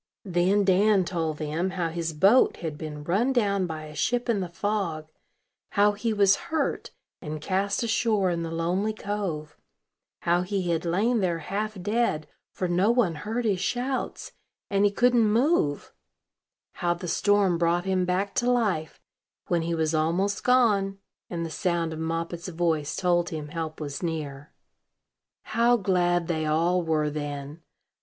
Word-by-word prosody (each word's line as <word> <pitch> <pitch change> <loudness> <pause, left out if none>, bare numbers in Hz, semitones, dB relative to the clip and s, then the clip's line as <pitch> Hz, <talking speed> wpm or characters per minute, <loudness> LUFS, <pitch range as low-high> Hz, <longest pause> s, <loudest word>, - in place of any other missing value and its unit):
Then 185 +2 +2
Dan 195 0 +4
told 165 -3 -2
them 155 +4 -2
how 180 -3 -2
his 165 0 -3
boat 195 +11 +4
had 160 -3 -4
been 150 -1 -7
run 200 - +1
down 200 -7 +1
by 160 -2 -5
a 150 0 -10
ship 240 +10 -1
in 225 -4 +2
the 180 -2 -3
fog; 170 -4 -2 0.7
how 205 0 +4
he 210 +3 -2
was 200 -2 +4
hurt, 320 - -1 0.3
and 155 -2 -5
cast 195 +7 -1
ashore 220 -4 +1
in 170 -1 -2
the 165 - -3
lonely 175 +6 -1
cove; 195 -8 -4 0.7
how 175 +1 +2
he 180 -1 -1
had 165 0 -1
lain 215 +8 +1
there 180 -4 0
half 200 +5 -4
dead, 205 -5 0 0.2
for 185 - -2
no 180 +4 +2
one 235 -8 +3
heard 220 +9 -3
his 200 -4 +1
shouts, 250 +7 -2 0.4
and 200 0 +3
he - - +5
couldn't 240 +2 +3
move; 230 - +1 0.8
how 175 0 +1
the 175 +1 -7
storm 195 -1 +2
brought 175 +1 +1
him 190 -1 +1
back 185 +3 -1
to 245 - +1
life, 205 - 0 0.5
when 170 -1 +2
he 170 +1 -1
was 160 -1 0
almost 175 +6 0
gone, 210 -6 +3 0.3
and 170 -1 -3
the 165 - -6
sound 170 -1 -1
of 160 - -6
Moppet's 165 +2 -3
voice 165 -4 -1
told 175 -1 +1
him 155 -2 -5
help 160 0 -5
was 145 -2 -5
near. 150 -4 -4 0.9
How 235 +2 +3
glad 175 -4 +1
they 160 -2 -1
all 170 +4 +2
were 155 -2 0
then! 145 +1 -5
180 Hz, 160 wpm, -26 LUFS, 160-205 Hz, 0.9 s, he